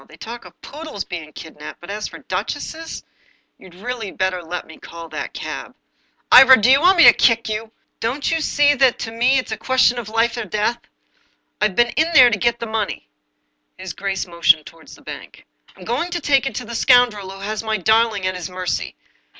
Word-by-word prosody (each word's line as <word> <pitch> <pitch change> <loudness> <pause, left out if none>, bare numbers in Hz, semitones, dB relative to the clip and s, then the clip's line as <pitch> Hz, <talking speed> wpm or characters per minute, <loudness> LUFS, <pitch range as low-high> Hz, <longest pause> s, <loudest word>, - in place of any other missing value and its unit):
They 155 - -16
talk 235 +5 -9
of - - -16
poodles 300 -8 -7
being 160 -4 -8
kid 160 0 -12
naped, 150 - -8
but 175 +3 -9
as 210 +1 -4
for - - -11
duchesses 290 - -5 0.3
— - - -41
You'd 185 -2 -16
really 225 +1 -5
better 185 -1 -2
let 175 +1 -6
me 160 - -15
call 165 -1 -11
that 155 -1 -6
cab." - - -7 0.3
" - - -44
Ivor, 260 +1 +9
do 240 +2 +3
you 275 +2 +5
want 370 +2 +4
me 340 - +7
to - - +9
kick 230 -1 +2
you? 220 +1 -4 0.3
Don't 255 +6 -2
you 325 0 0
see 290 -1 +3
that 265 -3 +3
to 225 - -6
me 245 +4 +2
it's 255 - -3
a 220 - -3
question 250 +1 +2
of 220 -3 -7
life 230 +2 0
and 220 -5 -5
death? 215 +4 -1 0.8
I've 210 -3 +1
been 240 0 +3
in 315 +7 0
there 255 -5 +7
to 205 - -1
get 235 +1 0
the 235 - -4
money." 215 - -4 0.7
His - - -7
grace 195 -1 -3
motioned 170 -3 +2
toward 165 -2 -15
the - - -15
bank. - - -10 0.2
" - - -28
I'm 180 - -13
going 260 +10 -2
to 345 0 -3
take 275 -3 +2
it - - -5
to 250 - -5
the 235 - -8
scoundrel 235 -5 +3
who 195 0 -10
has 210 +1 -4
my 220 -1 -2
darling 220 0 +1
at 185 - 0
his 180 -2 -6
mercy. 180 -1 -4
225 Hz, 225 wpm, -20 LUFS, 185-255 Hz, 0.8 s, Ivor